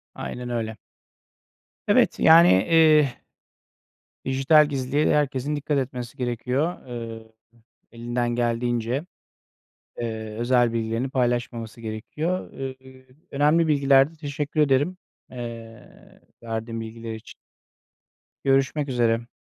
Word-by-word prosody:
Aynen 125 0 -6
öyle. 110 -2 -3 1.1
Evet, - - +3
yani 165 +2 +7 0.2
eee 155 -5 +5 1.1
dijital 135 +3 +4
gizliliğe 140 +2 +1
herkesin 145 0 0
dikkat 145 0 -1
etmesi 125 -3 -4
gerekiyor. 125 +7 -2
Eee, 115 -2 -7 0.6
elinden 120 +1 -2
geldiğince, 120 +3 -1 0.9
eee, 110 -2 -5
özel 120 -1 +2
bilgilerini 115 +3 -2
paylaşmaması 120 -3 -2
gerekiyor. 150 +11 -4
Iıı, 130 -1 -9 0.3
önemli 150 +4 +3
bilgilerdi. 140 +1 +3
Teşekkür 150 0 -2
ederim, 145 +6 +2 0.3
eee, 115 -2 -10 0.2
verdiğin 115 0 -4
bilgiler 115 0 -7
için. 110 - -12 1.1
Görüşmek 135 +2 +1
üzere. 120 -2 +1
125 Hz, 95 wpm, -24 LUFS, 115-145 Hz, 1.1 s, yani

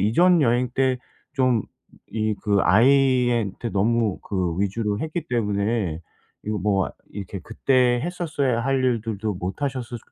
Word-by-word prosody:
이전 170 - +4
여행 120 0 +2
때 130 -1 +2 0.4
좀 130 -6 +2 0.5
이 110 -1 0
그 100 -1 +2
아이한테 120 0 +3
너무 110 0 +1
그 90 -4 -2
위주로 105 +1 -1
했기 160 +1 -4
때문에 105 -6 -1 0.4
이거 105 0 -2
뭐 95 0 +1 0.2
이렇게 100 -1 -6
그때 125 +3 +2
했었어야 150 -9 -1
할 135 0 +1
일들도 110 -4 -1
못 90 +8 -5
하셨을 125 -4 -3
115 Hz, 255 characters per minute, -23 LUFS, 100-130 Hz, 0.5 s, 이전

